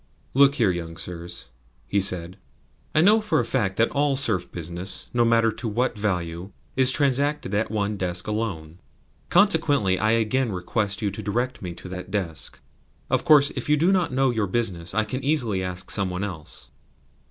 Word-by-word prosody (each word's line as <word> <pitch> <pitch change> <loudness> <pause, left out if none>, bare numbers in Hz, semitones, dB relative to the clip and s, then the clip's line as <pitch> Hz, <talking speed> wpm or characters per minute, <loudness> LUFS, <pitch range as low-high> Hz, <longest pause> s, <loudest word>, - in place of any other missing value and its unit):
"Look 140 +1 +5
here, 110 -8 +3
young 85 -2 -6
sirs," 85 -3 -7 0.4
he 100 +7 +1
said. 90 0 +2 0.6
"I 155 - +5
know 210 +5 +5
for 175 -8 +1
a 120 - 0
fact 110 -6 0
that 115 - +2
all 145 -1 +1
serf 110 -10 +1
business, 85 +3 -5
no 120 -1 +3
matter 115 -1 +3
to 110 - -6
what 120 +4 0
value, 90 -3 -3 0.2
is 130 0 +6
transacted 140 -4 0
at 105 +2 0
one 105 -1 -2
desk 90 -1 -1
alone. 90 -7 -4 0.5
Consequently 145 - +3
I 110 +1 +2
again 115 +2 +1
request 100 +3 -2
you 100 - 0
to 100 - -6
direct 120 +5 -2
me 90 -3 -5
to 90 - -10
that 90 0 -7
desk. 95 -6 -4 0.5
Of - - +2
course, 145 -2 +6
if - - -5
you 150 - +4
do 170 +6 +3
not 185 -6 +1
know 130 0 +2
your 110 -4 -1
business 95 -6 -2
I 110 - +3
can 130 +5 -5
easily 125 -10 +1
ask 90 0 -4
some 100 -2 0
one 90 +2 -3
else." 85 -7 -6
105 Hz, 185 wpm, -24 LUFS, 90-130 Hz, 0.6 s, is